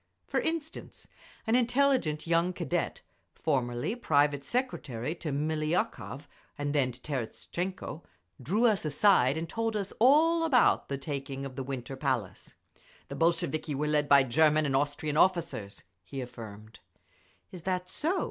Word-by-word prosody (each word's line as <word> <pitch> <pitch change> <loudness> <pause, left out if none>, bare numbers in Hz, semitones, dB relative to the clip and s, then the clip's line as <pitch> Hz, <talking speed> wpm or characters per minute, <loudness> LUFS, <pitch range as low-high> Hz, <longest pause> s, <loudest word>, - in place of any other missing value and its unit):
For - - 0
instance, 320 -1 -4 0.4
an 225 - +1
intelligent 245 - +2
young 170 +2 +2
Cadet, 170 -5 -2 0.3
formerly 120 - -1
private 145 - +2
secretary 150 - -2
to 170 -3 -5
Miliukov 155 - -1 0.3
and 145 -1 -2
then 135 -4 +2
to 120 - -13
Terestchenko, 155 +7 -4 0.4
drew 205 - +1
us 215 -4 +3
aside 150 -3 +4
and 165 +1 -3
told 225 +3 -2
us 200 -1 -4
all 315 +7 +5
about 280 -7 +3
the 140 - -2
taking 140 -1 -5
of 135 -2 -7
the 135 - -4
Winter 135 -1 -5
Palace. 130 -9 -3 0.5
"The - - -5
Bolsheviki 165 -3 0
were 150 +3 -1
led 150 -1 +1
by 140 -1 +7
German 155 +4 +3
and 135 -2 0
Austrian 145 +2 0
officers," 165 - +1 0.2
he 115 +9 -7
affirmed. 110 -3 -9 0.7
"Is 180 - -8
that 180 +1 -2
so?" 335 - -1
155 Hz, 140 wpm, -29 LUFS, 135-190 Hz, 0.7 s, by